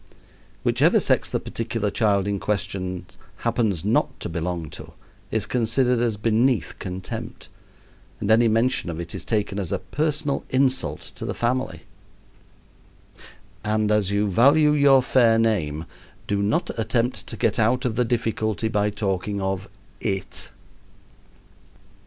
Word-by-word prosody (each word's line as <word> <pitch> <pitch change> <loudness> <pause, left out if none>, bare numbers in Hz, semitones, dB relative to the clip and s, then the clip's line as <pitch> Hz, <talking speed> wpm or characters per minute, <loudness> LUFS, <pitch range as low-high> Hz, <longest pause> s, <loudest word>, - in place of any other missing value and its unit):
Whichever - - +4
sex - - +1
the - - -1
particular 115 -2 -3
child 100 -3 +2
in 100 -1 -1
question 95 -3 -3 0.4
happens 110 -8 0
not - - +1
to - - -4
belong 85 0 -3
to - - -10 0.4
is 110 -2 -1
considered 125 +2 +1
as 115 -3 0
beneath 115 +3 +1
contempt, 95 -1 -6 0.7
and 100 - 0
any 115 +1 +5
mention 115 -3 +1
of 80 -1 -4
it 85 0 -6
is - - -5
taken 105 -2 -1
as 95 -5 -3
a - - +1
personal 150 +7 -1
insult 130 0 +1
to - - -8
the - - -3
family. 130 +2 -1 1.8
And 105 0 +1
as 105 -3 +2
you 100 +1 +1
value 140 - +5
your 140 -3 +5
fair 120 -3 +4
name 85 -9 0 0.4
do 100 -1 0
not 110 - 0
attempt 120 +2 -1
to - - -6
get - - +1
out 120 +4 +2
of 115 -3 0
the 125 - +2
difficulty 110 -2 -1
by 105 -1 +1
talking 100 -1 -2
of 95 0 -2 0.3
"it." 95 -2 -3
110 Hz, 140 wpm, -24 LUFS, 100-120 Hz, 1.8 s, any